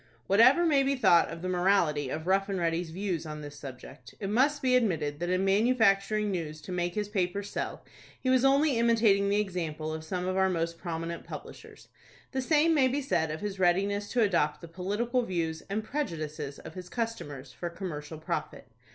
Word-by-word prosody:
Whatever 255 Hz, -, +6 dB
may 290 Hz, -4 st, +4 dB
be 275 Hz, +1 st, +1 dB
thought 190 Hz, -9 st, +4 dB
of 165 Hz, +1 st, -8 dB
the -, -, -2 dB
morality 175 Hz, -6 st, +2 dB
of 155 Hz, +4 st, -4 dB
Rough 195 Hz, +2 st, +2 dB
and 195 Hz, -, -1 dB
Ready's 170 Hz, 0 st, -1 dB
views 180 Hz, -1 st, -3 dB
on 150 Hz, -1 st, -7 dB
this 145 Hz, -1 st, -8 dB
subject, 130 Hz, -2 st, -11 dB
it 195 Hz, -1 st, -3 dB
must 280 Hz, +6 st, +2 dB
be 255 Hz, -1 st, +4 dB
admitted 160 Hz, -11 st, 0 dB
that 175 Hz, +1 st, -2 dB
in 185 Hz, +1 st, +1 dB
manufacturing 210 Hz, -1 st, +3 dB
news 155 Hz, -4 st, -4 dB
to 185 Hz, -, -9 dB
make 175 Hz, -1 st, -2 dB
his 210 Hz, -1 st, -1 dB
papers 200 Hz, 0 st, -2 dB
sell, -, -, -4 dB, 0.3 s
he 260 Hz, -, -5 dB
was 255 Hz, -1 st, +4 dB
only 275 Hz, -1 st, +4 dB
imitating 220 Hz, -4 st, +3 dB
the 205 Hz, +1 st, +2 dB
example 160 Hz, -6 st, -3 dB
of 160 Hz, 0 st, -5 dB
some 180 Hz, +3 st, -3 dB
of 185 Hz, 0 st, -1 dB
our 190 Hz, 0 st, +3 dB
most 165 Hz, -1 st, -2 dB
prominent 170 Hz, -1 st, -4 dB
publishers. -, -, -10 dB, 0.4 s
The 265 Hz, -, -1 dB
same 310 Hz, +4 st, +3 dB
may 275 Hz, -4 st, +4 dB
be 275 Hz, +3 st, -1 dB
said 170 Hz, -, 0 dB
of 155 Hz, +1 st, -5 dB
his 200 Hz, -2 st, -4 dB
readiness 200 Hz, +3 st, +1 dB
to 245 Hz, -, +3 dB
adopt 170 Hz, -7 st, +1 dB
the 170 Hz, -, -9 dB
political 205 Hz, +9 st, -1 dB
views 165 Hz, -7 st, -2 dB
and 210 Hz, +2 st, -2 dB
prejudices 155 Hz, -, -4 dB
of -, -, -10 dB
his 180 Hz, -1 st, -9 dB
customers, 145 Hz, -, -5 dB
for 175 Hz, -, -5 dB
commercial 160 Hz, -4 st, -6 dB
profit. 165 Hz, +2 st, -4 dB
190 Hz, 195 wpm, -29 LUFS, 165-220 Hz, 0.4 s, Whatever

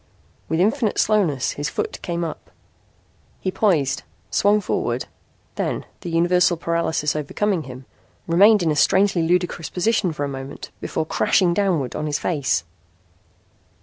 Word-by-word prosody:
With 160 Hz, +1 st, 0 dB
infinite 220 Hz, +3 st, +1 dB
slowness 180 Hz, -12 st, +2 dB
his 145 Hz, +1 st, -3 dB
foot -, -, -4 dB
came 170 Hz, -1 st, -3 dB
up. 160 Hz, -2 st, -6 dB, 0.9 s
He 185 Hz, -, -2 dB
poised, 165 Hz, -11 st, +1 dB, 0.3 s
swung 205 Hz, +1 st, +3 dB
forward, 125 Hz, -, -2 dB, 0.5 s
then, -, -, -2 dB
the -, -, -6 dB
universal 175 Hz, +1 st, +3 dB
paralysis 165 Hz, -3 st, -1 dB
overcoming 165 Hz, +4 st, -1 dB
him, 130 Hz, 0 st, -10 dB, 0.4 s
remained 200 Hz, +4 st, +5 dB
in 160 Hz, -, +2 dB
a -, -, 0 dB
strangely 190 Hz, +4 st, +3 dB
ludicrous 175 Hz, 0 st, 0 dB
position 195 Hz, -1 st, +1 dB
for 150 Hz, -2 st, -4 dB
a -, -, -1 dB
moment 135 Hz, 0 st, -7 dB
before 160 Hz, -, -2 dB
crashing 175 Hz, +2 st, +2 dB
downward 175 Hz, -9 st, 0 dB
on 155 Hz, -, -2 dB
his 145 Hz, -1 st, 0 dB
face. 130 Hz, -, 0 dB
170 Hz, 140 wpm, -22 LUFS, 150-190 Hz, 0.9 s, remained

